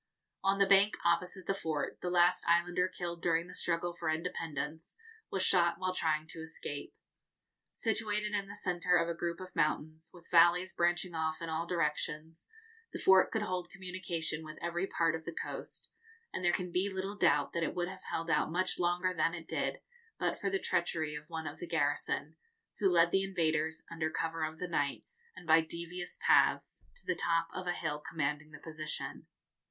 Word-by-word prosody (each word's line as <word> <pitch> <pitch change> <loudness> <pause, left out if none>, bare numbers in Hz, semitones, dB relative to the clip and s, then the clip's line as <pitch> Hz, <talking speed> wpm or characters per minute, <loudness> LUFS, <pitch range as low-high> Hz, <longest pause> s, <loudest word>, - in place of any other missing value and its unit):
On 195 0 +3
the 200 - +5
bank 195 +1 +5
opposite 180 +2 +1
the 195 - +1
fort, 160 -7 -3
the 180 - -2
last 180 0 +4
islander 175 +2 +3
killed 170 -2 -5
during 165 -1 +2
the 180 - -11
struggle 175 0 -1
for 170 -2 -3
independence 160 - -3 0.3
was 190 - 0
shot 175 -2 +4
while 185 -1 -1
trying 155 -3 +1
to - - -6
escape. 160 -3 -5 0.8
Situated 210 -1 0
in 200 -1 -1
the 200 - -8
centre 180 -2 +1
of 170 0 +2
a 170 - -1
group 170 0 -3
of 185 -1 -9
mountains, 155 +1 0
with 175 -2 -16
valleys 175 +2 +5
branching 175 +1 +1
off 160 -1 -1
in 165 - -5
all 160 +1 -2
directions, 160 -1 -1 0.4
the - - -5
fort 190 0 +6
could 220 -2 -1
hold 180 -3 -3
communication 180 -4 -3
with 155 0 -9
every 175 +2 -1
part 165 -3 +1
of 160 0 -4
the 170 - -5
coast, - - -5 0.5
and 185 - -3
there 175 - +4
can 180 0 -2
be 190 +3 +1
little 190 +2 -3
doubt 150 -7 +3
that 170 - -1
it 165 - -1
would 175 -1 0
have 190 +1 -8
held 165 0 -2
out - - +2
much 185 +2 +1
longer 180 +1 +1
than 165 0 +1
it 165 -1 -9
did, - - -2 0.4
but - - -1
for - - 0
the 390 - +1
treachery 165 - 0
of 150 0 -8
one 160 -1 -4
of - - -6
the 175 - -6
garrison, 150 0 0 0.4
who 200 -3 +4
led 170 -1 +5
the 195 - +3
invaders, 160 -4 0
under 160 -1 -1
cover 165 0 -2
of 155 0 -3
the 180 - -3
night, 145 -5 -1 0.3
and - - -11
by 160 0 +6
devious 170 +2 -5
paths, - - +4
to - - -12
the - - +1
top 165 0 +1
of 180 - -5
a - - +2
hill 155 -4 -2
commanding 150 -1 -2
the 150 - -10
position. 155 0 -4
170 Hz, 195 wpm, -33 LUFS, 160-180 Hz, 0.8 s, fort